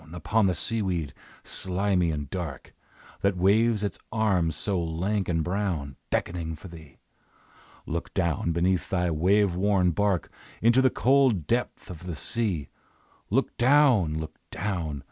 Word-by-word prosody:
Upon 100 Hz, +5 st, +1 dB
the 90 Hz, -, +1 dB
seaweed, 95 Hz, -, -1 dB, 0.3 s
slimy 95 Hz, -1 st, 0 dB
and 75 Hz, -2 st, -3 dB
dark, 85 Hz, -8 st, -6 dB, 0.5 s
That 100 Hz, -2 st, +1 dB
waves 105 Hz, +4 st, +3 dB
its 100 Hz, -, -3 dB
arms 95 Hz, -8 st, +1 dB
so 95 Hz, -4 st, -1 dB
lank 90 Hz, +5 st, -1 dB
and 80 Hz, -2 st, +1 dB
brown, 85 Hz, -7 st, -2 dB
Beckoning 85 Hz, -2 st, -2 dB
for 90 Hz, +5 st, -11 dB
thee! 80 Hz, -5 st, -13 dB, 0.9 s
Look 85 Hz, +1 st, -4 dB
down 85 Hz, -3 st, 0 dB
beneath 90 Hz, +1 st, 0 dB
thy 90 Hz, -2 st, 0 dB
wave 95 Hz, +4 st, +3 dB
worn 95 Hz, -1 st, +2 dB
bark 100 Hz, 0 st, 0 dB, 0.3 s
Into 120 Hz, +3 st, +4 dB
the 130 Hz, -, +5 dB
cold 130 Hz, -, +3 dB
depth 120 Hz, -3 st, -2 dB
of 90 Hz, +1 st, -10 dB
the 85 Hz, -, -4 dB
sea! 95 Hz, -6 st, -2 dB, 0.6 s
Look -, -, 0 dB
down! 125 Hz, -, +4 dB
Look 80 Hz, 0 st, -6 dB
down! 85 Hz, -6 st, -3 dB
90 Hz, 140 wpm, -27 LUFS, 80-105 Hz, 0.9 s, the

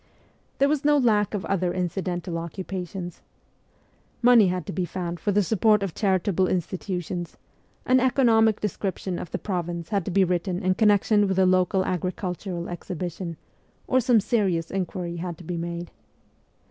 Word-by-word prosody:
There 275 Hz, -, +4 dB
was 295 Hz, 0 st, 0 dB
no 295 Hz, 0 st, +4 dB
lack 215 Hz, -6 st, +2 dB
of 195 Hz, -, -3 dB
other 185 Hz, -2 st, 0 dB
incidental 175 Hz, -1 st, -2 dB
occupations. 180 Hz, +1 st, -6 dB, 1.0 s
Money 240 Hz, -4 st, +7 dB
had 180 Hz, -2 st, -2 dB
to -, -, -5 dB
be 185 Hz, -, -1 dB
found 175 Hz, -1 st, -4 dB
for 205 Hz, -, 0 dB
the 205 Hz, +1 st, +3 dB
support 210 Hz, +1 st, +3 dB
of 190 Hz, -5 st, -3 dB
charitable 190 Hz, -2 st, +1 dB
institutions; 180 Hz, -1 st, -3 dB, 0.5 s
an 255 Hz, 0 st, +4 dB
economic 230 Hz, -4 st, +3 dB
description 190 Hz, -2 st, -3 dB
of 170 Hz, -, -6 dB
the -, -, -3 dB
province 175 Hz, -3 st, -4 dB
had 200 Hz, -3 st, 0 dB
to -, -, -3 dB
be 195 Hz, +1 st, +3 dB
written 180 Hz, +1 st, -1 dB
in 185 Hz, 0 st, +3 dB
connection 205 Hz, +1 st, +3 dB
with 190 Hz, -1 st, -1 dB
a 190 Hz, -, +5 dB
local 185 Hz, +1 st, +2 dB
agricultural 180 Hz, 0 st, -3 dB
exhibition; 175 Hz, -1 st, -5 dB, 0.5 s
or 260 Hz, -, +3 dB
some 245 Hz, -2 st, +4 dB
serious 190 Hz, -7 st, 0 dB
inquiry 180 Hz, -2 st, -3 dB
had 170 Hz, -1 st, -5 dB
to 175 Hz, -, -12 dB
be 175 Hz, +2 st, -4 dB
made. 170 Hz, 0 st, -5 dB
185 Hz, 160 wpm, -25 LUFS, 175-205 Hz, 1.0 s, Money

